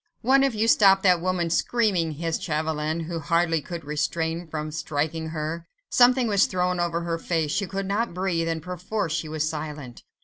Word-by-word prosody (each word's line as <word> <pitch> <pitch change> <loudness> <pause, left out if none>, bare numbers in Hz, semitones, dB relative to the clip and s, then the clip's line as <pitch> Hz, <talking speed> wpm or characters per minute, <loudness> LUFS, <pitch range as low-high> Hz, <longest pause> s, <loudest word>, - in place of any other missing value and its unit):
"One 270 +3 +5
of 270 -4 +1
you 215 +1 +1
stop 195 -4 +5
that 180 -3 +4
woman 180 -2 -1
screaming," 185 -5 +1
hissed 165 +2 -3
Chauvelin, 155 0 -1
who 165 +1 -4
hardly 165 +1 +1
could 170 0 -7
refrain 160 +3 -2
from 155 -1 -4
striking 160 +1 -2
her. 160 +2 -4 0.2
Something 250 0 +5
was 200 -3 +3
thrown 180 0 0
over 170 -1 0
her 170 -1 -2
face; 165 -3 -1
she 200 +2 -1
could 195 +1 -3
not 210 +5 -1
breathe, 180 -3 -1
and 165 -2 -2
perforce 180 0 -3
she 160 -1 -2
was 155 0 -1
silent. 150 -5 -6
170 Hz, 180 wpm, -25 LUFS, 155-190 Hz, 0.2 s, One